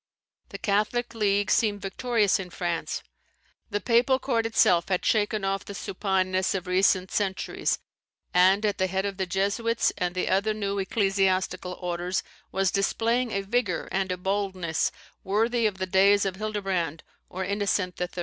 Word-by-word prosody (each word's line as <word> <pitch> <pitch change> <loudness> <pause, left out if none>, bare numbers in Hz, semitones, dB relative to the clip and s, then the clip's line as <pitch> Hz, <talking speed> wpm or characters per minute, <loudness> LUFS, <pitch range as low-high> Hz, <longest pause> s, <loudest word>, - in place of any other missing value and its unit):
The - - -7
Catholic 215 +4 0
league 205 -2 +1
seemed 205 -3 +2
victorious 215 0 +1
in 185 -2 -6
France. 175 -1 -3 0.7
The 205 - -1
Papal 245 +4 +3
Court 235 -4 0
itself 180 -6 +3
had 185 -2 0
shaken 210 -2 +1
off 195 0 -1
the 200 - -8
supineness 190 -1 0
of 185 -1 -3
recent 185 0 +2
centuries; 195 -2 -1 0.6
and, 190 +4 +5
at 205 -1 0
the 190 - +2
head 190 +1 -1
of 200 -1 -3
the 190 -1 -2
Jesuits 205 +5 0
and 180 0 -1
the 185 - -1
other 200 +3 +1
new 200 -1 -2
ecclesiastical 195 -2 0
orders, 180 0 -2 0.3
was 190 -1 +1
displaying 230 +5 +1
a 195 -2 -1
vigour 205 -3 -1
and 190 -1 -1
a 180 - -2
boldness 190 -3 -1 0.3
worthy 225 +4 +2
of 200 -2 -4
the 190 - -2
days 200 +2 +4
of 190 -1 -2
Hildebrand 195 -7 -2 0.3
or 190 +1 -4
Innocent 200 -2 -1
III. 180 - -1
195 Hz, 160 wpm, -26 LUFS, 185-210 Hz, 0.7 s, and